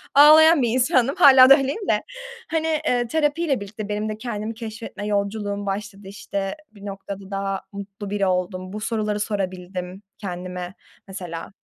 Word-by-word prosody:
Ağlayan 310 +2 +8
bir 240 - +2
insandım. 255 +2 +2
Hâlâ 265 -7 +8
da 275 - +9
öyleyim 280 +9 -3
de. - - +2 0.5
Hani, 320 0 0 0.2
eee, 245 -1 +1
terapiyle 295 +1 0
birlikte 205 +1 -7
benim 210 +1 -2
de 215 - -4
kendimi 220 -1 -4
keşfetme 225 -2 -7
yolculuğum 205 0 -2
başladı, 200 0 -5
işte, 195 0 -4 0.2
bir 205 -2 -14
noktada 195 0 -7
daha 195 0 -2
mutlu 200 0 -8
biri 200 -1 0
oldum. 185 0 -2
Bu 210 - -4
soruları 215 -2 -1
sorabildim 185 -2 -4 0.2
kendime 180 -2 -6 0.3
mesela. 180 -3 -7
205 Hz, 150 wpm, -23 LUFS, 195-245 Hz, 0.5 s, da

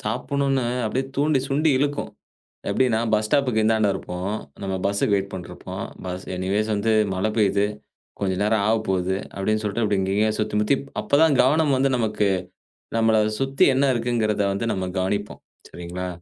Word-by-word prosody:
சாப்புணுன்னு 135 +4 -1 0.2
அப்படியே 130 +5 -1
தூண்டி, 145 0 +2
சுண்டி 150 +3 +2
இழுக்கும். 145 +1 -1 0.6
எப்டின்னா, 115 +1 +2
பஸ் 105 0 +2
ஸ்டாப்புக்கு 125 -4 +2
இந்தாண்ட 110 -1 +3
இருப்போம், 90 +3 -4 0.3
நம்ம 95 -1 -2
பஸ்ஸுக்கு 100 +1 +1
வெயிட் 100 0 -2
பண்ட்ருப்போம், 90 -2 -7 0.2
பஸ் 90 0 -5
எனிவேஸ் 100 +4 -1
வந்து 105 +2 +1 0.2
மழை 95 +4 0
பெய்யுது, 100 -2 +3 0.5
கொஞ்சம் 95 -1 -1
நேரம் 105 -1 +2
ஆவப்போது, 95 -4 0 0.2
அப்படின்னு 110 +2 0
சொல்ட்டு, 105 +3 -2
அப்டி 105 -2 +1
இங்கங்கயே 105 +3 +1
சுத்தி 105 -1 -1
முத்திப் 135 +6 +1 0.2
அப்பதான் 140 +5 +3
கவனம் 145 +2 +3
வந்து 135 +1 +2
நமக்கு, 105 -3 0 0.7
நம்மள 115 -1 +3 0.2
சுத்தி 135 0 +2
என்ன 140 +2 +3
இருக்குங்கிறத 115 -3 0
வந்து 100 +4 -2
நம்ம 95 -1 -3
கவனிப்போம், 100 +2 -2 0.3
சரிங்களா! 90 +1 -6
110 Hz, 150 wpm, -23 LUFS, 100-130 Hz, 0.7 s, இந்தாண்ட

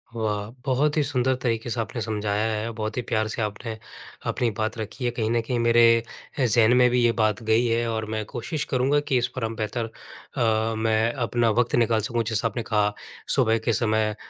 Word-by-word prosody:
वाह! 105 -2 -2 0.2
बहुत 145 +3 +1
ही - - +4
सुंदर 130 -2 +1
तरीके 115 -1 -1
से 115 +1 -2
आपने 115 +1 -5
समझाया 105 -1 -1
है, 110 +2 -2
बहुत 110 0 -4
ही - - +1
प्यार 110 -1 +1
से 110 - -4
आपने 110 +2 -4 0.5
अपनी 120 -2 0
बात 110 +2 -2
रखी 110 +4 -5
है। 120 - +1
कहीं 110 -2 -2
न 120 0 +2
कहीं 125 - 0
मेरे 115 0 +5 0.5
अ, 130 - +3
ज़हन 115 +1 +4
में 125 0 +6
भी 125 0 +2
ये 120 - +4
बात 105 -1 +1
गई 110 +2 +3
है 115 0 +1
और 110 -1 -2
मैं 110 0 -2
कोशिश 140 +6 -4
करूँगा 135 +3 +3
कि 140 -3 0
इस 120 0 +1
पर 130 - -3
हम 115 0 -4
बेहतर 110 +2 -2 0.5
अ, 110 -1 +1
मैं 110 +1 +1
अपना 120 -2 +1
वक़्त 120 +2 +1
निकाल 115 -2 +3
सकूँ, 115 +2 -1
जैसा 110 0 0
आपने 115 +1 -4
कहा, 105 -1 +1 0.4
सुबह 115 -4 +3
के 115 - +2
समय 110 0 +1
अ, - - -8
115 Hz, 220 wpm, -25 LUFS, 110-120 Hz, 0.5 s, में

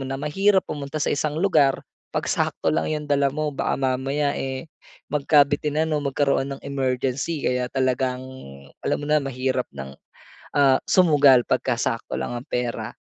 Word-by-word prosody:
na 135 - -3
mahirap 190 +8 +2
pumunta 145 0 -6
sa 150 - 0
isang 150 +1 -1
lugar 155 -7 +3 0.3
'pag - - -3
sakto 80 - 0
lang 80 +1 0
'yong 150 -1 -2
dala 140 -1 +2
mo. 150 +2 -3
Baka 135 - -1
mamaya, 135 +2 0
eh, 130 -1 -4 0.5
magkabitinan 150 +2 +2
o 150 - +1
magkaroon 140 -1 0
ng - - -18
emergency 135 +2 -2
kaya 125 0 0
talagang 130 -1 -1 0.6
alam - - 0
mo 145 - -6
na 150 +1 +2
mahirap 130 -2 -2
ng, 65 0 -7 0.6
ah, 135 -2 +5
sumugal 145 -8 +5
'pagka 130 -1 +1
sakto 115 -2 -2
lang - - -3
ang 120 - -8
pera. 125 -1 -3
140 Hz, 155 wpm, -23 LUFS, 130-150 Hz, 0.6 s, ah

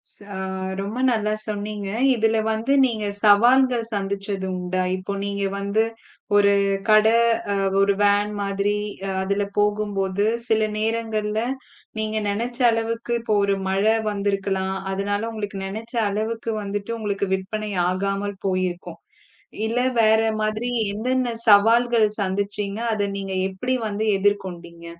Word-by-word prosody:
ஆமா. 205 -1 -11 0.5
ரொம்ப 205 +5 -4
நல்லா 215 -3 0
சொன்னீங்க. 205 -1 -4 0.3
இதுல 225 -1 +2
வந்து 220 +4 -1
நீங்கச் 210 -4 -2
சவால்கள் 240 +4 +5
சந்திச்சது 195 -1 -3
உண்டா? 180 +1 -1
இப்போ 185 +2 -5
நீங்க 200 0 -2
வந்து 200 +2 +1 0.5
ஒரு 200 0 +5 0.4
கடை, 215 +1 +6 0.4
அ, - - +1 0.2
ஒரு 200 0 +4
வேன் 205 +1 +3
மாதிரி 200 +1 0 0.5
அதுல 200 +1 0
போகும்போது 205 -1 0 0.2
சில 220 -1 +2 0.2
நேரங்கள்ல 220 -1 -1 0.6
நீங்க 215 0 -1
நெனைச்ச 235 +4 -3
அளவுக்கு 230 +1 -2
இப்போ 220 -2 0
ஒரு 200 0 +2
மழை 200 +4 +2
வந்திருக்கலாம். 195 -2 -1 0.2
அதனால 200 +1 -1
உங்களுக்கு 205 -3 -5
நெனைச்ச 220 +5 -7
அளவுக்கு 225 +3 -2
வந்துட்டு 205 +2 -4
உங்களுக்கு 200 -2 -2
விற்பனை 210 +3 -5 0.2
ஆகாமல் 195 +2 -2
போயிருக்கும். 185 -1 -2 0.7
இல்ல 230 +2 0 0.2
வேற 220 0 +5 0.2
மாதிரி 215 +3 -1 0.2
என்னென்ன 245 +3 -1
சவால்கள் 225 +2 +5
சந்திச்சீங்க? 200 +1 -2 0.2
அதை 205 -1 0
நீங்க 195 -1 -5 0.2
எப்படி 250 +7 -2
வந்து 210 +1 -2
எதிர்கொண்டீங்க? 175 -4 -2
205 Hz, 120 wpm, -23 LUFS, 200-220 Hz, 0.7 s, கடை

